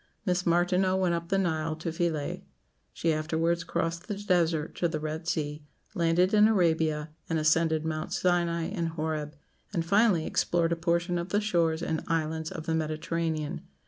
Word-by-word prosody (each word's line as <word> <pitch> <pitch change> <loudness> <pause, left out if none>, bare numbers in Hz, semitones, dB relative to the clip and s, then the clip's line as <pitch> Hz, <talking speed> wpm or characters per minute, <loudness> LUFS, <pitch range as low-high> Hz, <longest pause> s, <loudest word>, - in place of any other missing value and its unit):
Miss 180 -2 0
Martineau 180 +2 +3
went 185 -2 +2
up 170 0 -3
the 195 - +2
Nile 160 -4 0
to 160 +1 -4
Philæ; 165 -3 -2 0.5
she 165 -1 0
afterwards 165 +2 0
crossed 165 +1 -2
the 210 - -2
desert 170 -6 +1
to 175 - +2
the 160 -2 -3
Red 155 +2 -4
Sea, 150 -3 -2 0.3
landed 175 +1 +2
in 210 0 +7
Arabia, 160 -6 +1 0.2
and 165 - +1
ascended 160 0 +2
Mounts 155 -1 -2
Sinai 170 -2 +1
and 170 -1 -2
Horeb; 155 -2 -3 0.4
and, 170 -5 -1
finally, 200 -3 +3
explored 170 -1 +1
a - - +2
portion 170 +1 0
of 170 +2 -4
the 205 - +2
shores 170 -6 +1
and 160 -2 -2
islands 160 -1 -1
of 160 -4 -7
the 165 - -1
Mediterranean. 160 0 -2
165 Hz, 170 wpm, -28 LUFS, 160-175 Hz, 0.5 s, in